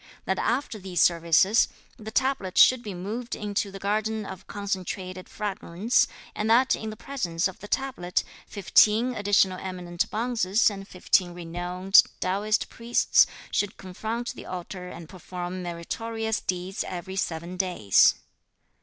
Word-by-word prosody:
That 190 - 0
after 235 -2 -1
these 185 -3 -3
services, 170 +6 +4 0.3
the 215 0 -7
tablet 230 -6 0
should 255 -2 +7
be 205 -5 -6
moved 220 +7 -4
into 205 -1 -2
the 195 - -8
Garden 215 +2 -1
of 190 -2 -9
Concentrated 185 -2 -4
Fragrance, 205 +1 0 0.3
and 210 +1 -2
that 250 +3 +5
in 220 - -5
the 215 - -7
presence 200 -9 -2
of 190 - -10
the 205 - -9
tablet, 255 -9 -1 0.2
fifteen 215 +4 +3
additional 200 -3 +2
eminent 180 -2 -3
bonzes 220 -2 +2
and 195 -1 -8
fifteen 180 -1 +1
renowned 175 +2 +3 0.2
Taoist 205 +4 0
Priests 235 +1 +3 0.2
should 205 0 -1
confront 220 +6 -4
the - - -10
altar 180 0 -6
and 170 -2 -9
perform 180 0 -6
meritorious 220 +6 -3
deeds 185 +2 -3
every 190 +1 -6
seven 170 -1 -3
days. 180 - +4
195 Hz, 135 wpm, -26 LUFS, 180-220 Hz, 0.3 s, should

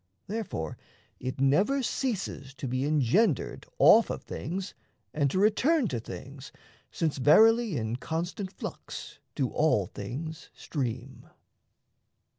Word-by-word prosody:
Therefore 190 - -4 0.4
it 130 +1 -4
never 195 - +3
Ceases 195 - -3
to 135 - -5
be 130 +2 -1
engendered 150 - +1
off - - +7
of - - -4
things 185 +7 -5 0.4
And 145 -2 +2
to 160 - -2
return 240 - +3
to 120 - -2
things, 135 +4 -9 0.4
since 155 -4 -1
verily 220 - +5
In 110 +1 -2
constant 175 +7 -4
flux - - -8 0.2
do 135 -4 0
all 150 -11 +2
things 150 - -7
stream. 130 -2 -5
150 Hz, 115 wpm, -28 LUFS, 130-200 Hz, 0.4 s, off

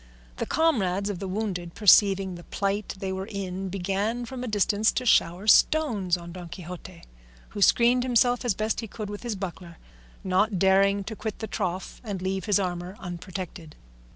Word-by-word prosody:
The - - -3
comrades 205 - +1
of 185 - -6
the 195 - -4
wounded 185 -4 -3
perceiving 195 -2 +5
the 175 0 -9
plight 200 +1 -2
they 190 0 -3
were 190 +1 -4
in 195 -2 -4
began 200 +6 -2
from 250 +1 -6
a - - -4
distance 210 0 +2
to 255 - -2
shower 180 -3 +3
stones 215 - +4
on 170 0 -9
Don 175 -1 -9
Quixote, 180 0 -9 0.5
who 205 - -6
screened 240 +4 +5
himself 245 0 +2
as 240 -6 +1
best 215 +2 -1
he 225 - -5
could 210 -1 -6
with 205 - -7
his 235 -3 -3
buckler, 180 -3 -7 0.5
not 190 +2 +1
daring 195 +2 +3
to 220 +3 -6
quit 215 0 -5
the 220 - -4
trough 190 -3 -4
and 205 -5 -4
leave 190 +1 -2
his 205 -2 +3
armour 180 0 -3
unprotected. 175 -2 -7
195 Hz, 180 wpm, -26 LUFS, 185-215 Hz, 0.5 s, perceiving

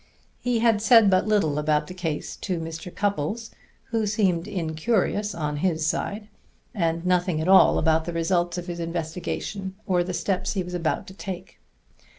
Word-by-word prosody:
He 245 -1 0
had 225 -3 +3
said 220 -2 +6
but 185 +2 +3
little 160 -9 +2
about 150 0 +1
the 180 - -8
case 165 -5 -4
to 180 -3 -3
Mr. 165 +2 -6
Cupples, 205 +4 -2 0.4
who 225 -2 +1
seemed 195 -4 +1
incurious 200 +3 -1
on 150 -2 -2
his 160 -1 0
side, 205 +6 -2 0.5
and 165 -4 -1
nothing 180 -2 +1
at 160 - -2
all 190 0 +7
about 160 0 +2
the 175 - -4
results 175 +1 0
of 175 - -4
his 175 -1 -5
investigation 175 +3 -4
or 180 -2 +2
the 180 - -4
steps 180 +2 -1
he 190 -3 -1
was 180 0 -8
about 170 -3 -1
to 190 - -11
take. 185 -1 -7
180 Hz, 170 wpm, -25 LUFS, 165-200 Hz, 0.5 s, all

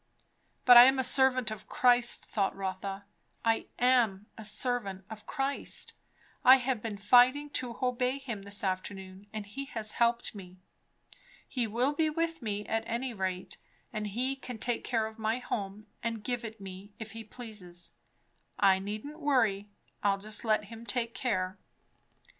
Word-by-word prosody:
But 245 -1 +10
I 240 - +12
am 265 +1 +5
a 260 - +2
servant 255 -2 +3
of 215 -3 -7
Christ 245 -1 +3
thought 195 -3 0
Rotha, 195 +1 -4 0.4
I 225 0 +2
am 235 -6 +3
a 220 - -9
servant 210 -3 -1
of 215 -1 -9
Christ; 275 -1 -2 0.5
I 260 - +10
have 255 -3 0
been 215 -2 -4
fighting 255 +8 +5
to 245 -4 -3
obey 250 +1 +1
him 240 -7 -5
this 200 +1 -3
afternoon, 190 +1 -4
and 215 -1 -5
he 270 +7 -6
has 220 -6 -3
helped 235 0 +1
me. 185 -3 -11 0.9
He 245 -4 -1
will 245 +7 +1
be 315 +1 +2
with 330 +1 -1
me, 210 -2 -3
at 225 0 -1
any 240 +2 -2
rate; 185 -3 -3 0.4
and 215 -1 -2
he 250 +6 -1
can 250 -3 -7
take 240 +1 -1
care 225 -3 0
of 220 +1 -8
my 220 +2 0
home 210 -4 -4 0.2
and 230 -2 -3
give 245 +1 -2
it 220 -1 -7
me, 195 +1 -9
if 220 -2 -7
he 225 +1 -7
pleases. 210 -7 -8 0.7
I 195 -2 +5
needn't 215 +10 -6
worry. 225 -9 +2 0.3
I'll 200 -1 +3
just 210 +2 -4
let 215 -2 +2
him 225 +2 -10
take 235 -1 -1
care. 185 -7 -1
225 Hz, 165 wpm, -31 LUFS, 200-250 Hz, 0.9 s, I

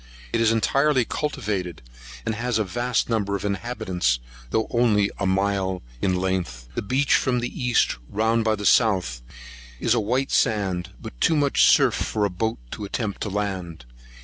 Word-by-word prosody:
It 115 - +2
is 115 -1 +4
entirely 135 +3 +2
cultivated, 105 - -3 0.4
and - - 0
a 120 -3 +1
vast 120 +5 -1
number 105 -4 0
of 100 - -4
inhabitants, 100 - -1 0.3
though 110 +7 +1
only 110 -4 +3
a - - 0
mile 95 -1 0 0.2
in 95 -1 +1
length. 90 -10 -2
The - - -2
beach 130 +7 +1
from 125 -1 +2
the 125 +1 -4
east, 125 -1 +2
round 110 +2 +1
by 110 -1 +2
the 105 -1 -6
south, 90 - +3 0.6
is 115 - +2
a 120 - +2
white 125 +6 0
sand, 95 -6 +1
but - - -10
too 165 - +4
much 145 -2 +4
surf - - +5
for 105 -2 -1
a 100 - -1
boat 110 +5 -2
to - - -6
attempt 100 0 -3
to 105 - -2
land. 95 -8 -4
105 Hz, 170 wpm, -24 LUFS, 95-120 Hz, 0.6 s, surf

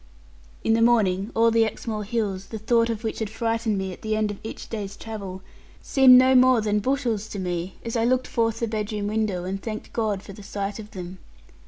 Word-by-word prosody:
In 225 - +3
the 225 - +3
morning 210 -4 +3
all 230 0 +4
the 225 0 +4
Exmoor 220 0 -3
hills, 200 -3 -2
the 220 - -6
thought 230 +2 +2
of 225 0 -3
which 220 - -3
had 220 -2 -2
frightened 225 -1 -1
me 190 -1 -3
at - - -13
the 215 0 -1
end 215 -1 0
of 205 - -8
each 220 - -7
day's 205 -3 -5
travel, 195 -4 -7 0.4
seemed 260 -2 +7
no 260 +1 +6
more 255 -1 +6
than 210 -1 +1
bushels 235 -3 -1
to 205 - -7
me, 180 -1 -3
as 230 - -3
I 230 - +2
looked 255 +1 +2
forth 225 -1 -1
the 230 - +1
bedroom 215 -1 -3
window, 210 -4 -1
and 195 +2 -4
thanked 215 0 -6
God 210 -4 -1
for 200 - -10
the 205 - -11
sight 200 +1 -4
of 210 -1 -9
them. 185 -2 -8
215 Hz, 220 wpm, -24 LUFS, 200-230 Hz, 0.4 s, seemed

